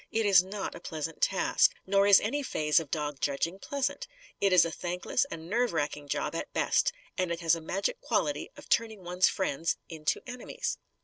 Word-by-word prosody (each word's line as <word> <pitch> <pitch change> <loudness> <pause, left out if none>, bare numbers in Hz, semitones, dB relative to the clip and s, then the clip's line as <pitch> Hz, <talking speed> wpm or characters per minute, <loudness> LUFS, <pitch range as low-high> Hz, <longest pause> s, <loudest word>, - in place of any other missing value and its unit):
It 225 -1 +1
is 195 -3 +7
not 195 +1 -5
a - - -9
pleasant 160 -1 -5
task. - - +3
Nor 200 +1 +3
is 200 -1 +8
any 280 +8 -1
phase 150 - +2
of 160 -3 -7
dog 150 -3 -3
judging 145 +7 -1
pleasant. 280 - -2 0.3
It 195 - +3
is 180 -2 +6
a 165 - -3
thankless 180 - -1
and 165 0 -7
nerve 240 +4 +1
racking 145 -2 -2
job, - - -2
at - - -4
best; - - +2 0.3
and 185 -2 0
it 170 +1 -3
has 165 -1 +3
a 165 - -7
magic 195 - -2
quality - - -1
of - - -12
turning 220 -4 0
one's 180 +1 +3
friends 165 -3 -1
into 155 -3 -1
enemies. 250 -1 -4
180 Hz, 195 wpm, -29 LUFS, 160-205 Hz, 0.3 s, is